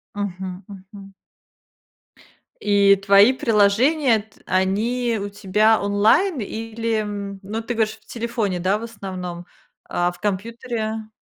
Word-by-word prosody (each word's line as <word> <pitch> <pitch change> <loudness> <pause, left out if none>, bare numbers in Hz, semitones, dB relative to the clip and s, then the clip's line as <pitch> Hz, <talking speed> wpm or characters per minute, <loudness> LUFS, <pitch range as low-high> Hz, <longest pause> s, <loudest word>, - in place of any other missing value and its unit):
Мгм, 190 -1 -5
мгм. 195 0 -12 1.5
И 200 -1 +5
твои 200 +5 +6
приложения, 230 +4 +3
т 215 +1 -16
они 220 +6 0
у 200 - -4
тебя 210 +2 +2
онлайн 215 - +3
или, 225 +1 -3
м, 200 -1 -5
ну, 215 +4 -4
ты 235 +2 -4
говоришь, 220 -1 0
в 215 - -32
телефоне, 230 -6 -2
да, 190 +4 +1
в 220 - -8
основном, 185 -6 -7 0.4
а 175 0 0
в 175 - -16
компьютере? 220 +1 -3
210 Hz, 125 wpm, -22 LUFS, 195-225 Hz, 1.5 s, твои